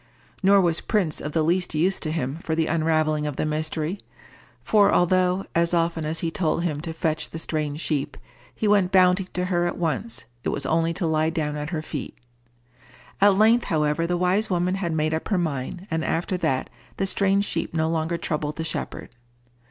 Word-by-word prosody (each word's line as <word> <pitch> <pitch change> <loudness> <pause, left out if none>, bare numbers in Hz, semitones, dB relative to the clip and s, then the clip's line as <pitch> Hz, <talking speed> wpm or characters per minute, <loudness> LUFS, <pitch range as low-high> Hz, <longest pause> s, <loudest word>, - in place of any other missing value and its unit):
Nor 200 0 +5
was 170 -2 +2
Prince 190 -8 0
of 150 - -4
the 160 - +2
least 175 +1 +1
use 180 +5 +2
to 155 - -3
him 150 -1 -2
for 160 - -2
the 160 0 +1
unravelling 155 -2 +1
of 145 - -4
the - - -1
mystery; 155 +4 -2 0.6
for 205 -2 +4
although, 185 +1 +2
as 170 +1 +2
often 165 -1 0
as 160 +2 -2
he 165 - -1
told 170 -1 0
him 150 -4 -2
to 165 0 -5
fetch 160 -1 -2
the - - -7
strange 155 -2 -3
sheep, 145 -2 -2 0.4
he 215 - -1
went 200 -3 +3
bounding 185 0 +4
to 180 0 -1
her 175 -1 +1
at 175 - -3
once, 130 - -2 0.2
it - - -1
was 140 - -2
only 165 +3 +1
to 170 +2 -2
lie 160 0 +2
down 155 -2 -2
at 150 0 -4
her 160 -3 -3
feet. 150 -3 -6 1.0
At 200 -1 +6
length, 225 +3 +4
however, 155 +1 +1
the 175 0 0
wise 185 +4 +1
woman 180 0 +1
had 190 -3 -2
made 155 0 0
up 160 - -2
her 200 - +1
mind, 160 +1 -3
and 160 0 0
after 175 +4 -1
that 130 -7 -1 0.3
the 195 - 0
strange 195 +1 +2
sheep - - -3
no 160 0 +1
longer 165 +1 -1
troubled 150 -2 -2
the 160 - -3
shepherd. 160 - -4
165 Hz, 200 wpm, -24 LUFS, 155-180 Hz, 1.0 s, At